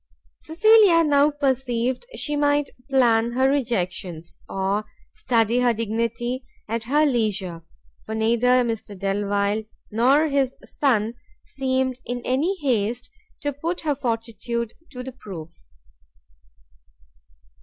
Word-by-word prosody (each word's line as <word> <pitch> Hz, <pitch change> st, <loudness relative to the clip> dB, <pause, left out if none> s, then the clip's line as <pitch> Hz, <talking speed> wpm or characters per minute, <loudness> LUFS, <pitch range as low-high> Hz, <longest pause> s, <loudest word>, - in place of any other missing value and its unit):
Cecilia 370 Hz, 0 st, +5 dB
now 290 Hz, -1 st, +4 dB
perceived 260 Hz, -, -1 dB
she 295 Hz, -, -1 dB
might 290 Hz, 0 st, +2 dB, 0.2 s
plan 235 Hz, -3 st, +3 dB
her 260 Hz, +2 st, +3 dB
rejections, 185 Hz, -, -2 dB
or 195 Hz, +2 st, -1 dB, 0.3 s
study 230 Hz, 0 st, +1 dB
her 245 Hz, -2 st, +3 dB
dignity 230 Hz, +3 st, -2 dB, 0.2 s
at 225 Hz, +1 st, -2 dB
her 295 Hz, +5 st, +3 dB
leisure, 205 Hz, -, -1 dB, 0.4 s
for 220 Hz, -, -5 dB
neither 235 Hz, +3 st, +3 dB
Mr 225 Hz, -3 st, -4 dB
Delvile 200 Hz, +2 st, 0 dB, 0.3 s
nor 265 Hz, +8 st, +4 dB
his 275 Hz, -3 st, 0 dB
son 230 Hz, -6 st, +1 dB, 0.3 s
seemed 260 Hz, -1 st, -1 dB
in 245 Hz, 0 st, -4 dB
any 295 Hz, +10 st, +1 dB
haste 240 Hz, -3 st, -1 dB, 0.3 s
to 290 Hz, 0 st, -1 dB
put 330 Hz, +6 st, -3 dB
her 300 Hz, -2 st, 0 dB
fortitude 230 Hz, -2 st, -3 dB, 0.2 s
to 250 Hz, -3 st, -7 dB
the 260 Hz, -, -6 dB
proof. 170 Hz, -, -11 dB
245 Hz, 110 wpm, -23 LUFS, 220-275 Hz, 0.4 s, Cecilia